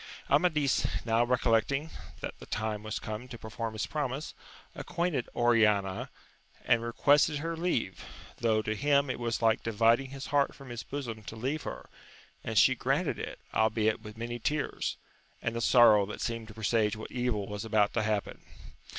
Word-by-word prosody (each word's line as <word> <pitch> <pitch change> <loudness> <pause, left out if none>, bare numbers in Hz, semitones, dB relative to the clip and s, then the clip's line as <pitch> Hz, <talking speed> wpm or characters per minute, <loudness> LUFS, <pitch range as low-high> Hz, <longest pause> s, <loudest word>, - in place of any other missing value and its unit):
Amadis 150 -2 +3 0.2
now 115 0 +3
recollecting 125 +5 +1 0.3
that - - -4
the - - -11
time 110 -1 -2
was 110 0 -4
come 110 +4 -6
to 125 -2 -8
perform 110 0 -5
his 110 - -2
promise, 145 0 -3 0.4
acquainted 170 -7 -2
Oriana, 105 -5 +2 0.6
and 120 -2 +4
requested 145 +5 +3
lier 165 0 -2
leave, 160 - -1 0.3
though 110 -2 +1
to 110 - -1
him 140 +2 +2
it - - -5
was 115 -1 -2
like 115 0 +3
dividing 115 +4 +2
his 135 0 -7
heart 140 -1 +2
from 135 -2 -12
his 120 -1 -5
bosom 120 -6 -5
to 110 - -7
leave 135 +7 -2
her; - - -7 0.6
and - - -3
she - - +7
granted - - 0
it, - - -5 0.2
albeit 110 0 +2
with 105 +1 -10
many 120 +1 -4
tears, 150 +6 -2 0.4
and 115 - -3
a 115 - -2
sorrow 110 -5 +6
that 105 - -7
seemed 115 -1 -3
to 110 - -11
presage 110 0 +1
what 110 - -8
evil 120 -5 -1
was 105 0 -5
about 110 -2 +2
to 115 - +1
happen. 105 -1 -2
115 Hz, 170 wpm, -30 LUFS, 110-135 Hz, 0.6 s, she